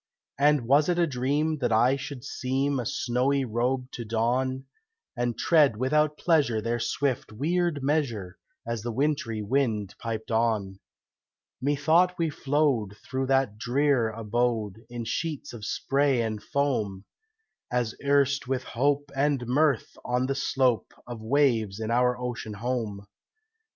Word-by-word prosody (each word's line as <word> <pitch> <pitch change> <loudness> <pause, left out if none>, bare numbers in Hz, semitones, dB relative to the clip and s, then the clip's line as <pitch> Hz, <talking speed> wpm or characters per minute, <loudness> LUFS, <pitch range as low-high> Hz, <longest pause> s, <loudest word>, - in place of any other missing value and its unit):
And 145 -3 +4
was 145 +5 +4
it 175 - +1
a 175 - +4
dream 145 +3 0
that 120 -3 0
I 120 +4 +4
should 135 -2 -7
seem 135 +1 -1
A 120 - -2
snowy 130 +2 0
robe 125 +3 -1
to 120 - -6
don, 125 +4 0 0.5
And 120 -2 -1
tread 150 -9 +4
without 150 +4 +1
pleasure 145 -10 +2
their 115 +2 -1
swift, 125 +2 -1
weird 155 +4 0
measure, 125 - -1 0.3
As 115 -1 -3
the 120 +2 -3
wintry 115 -4 -1
wind 110 -4 0
piped 115 -1 -4
on. 110 -4 0 0.8
Methought 155 +6 +3
we 165 -2 0
flowed 135 -9 0
through 130 +2 -3
that 135 -6 +1
drear 125 0 +2
abode 110 -1 -1
In 120 -1 -5
sheets 155 +3 -3
of 110 -3 -7
spray 135 +1 +1
and 110 -2 -3
foam, 120 - -1 0.7
As 120 -2 0
erst 140 -1 +2
with 130 -1 -1
hope 145 +3 0
and 140 -2 +1
mirth 140 0 +1
on 125 +1 0
the 135 - 0
slope 130 -3 0
Of 120 -2 -7
waves 115 -5 +1
in 110 0 -3
our 125 +1 +2
ocean 120 -3 -5
home. 110 -3 -3
125 Hz, 140 wpm, -27 LUFS, 115-140 Hz, 0.8 s, And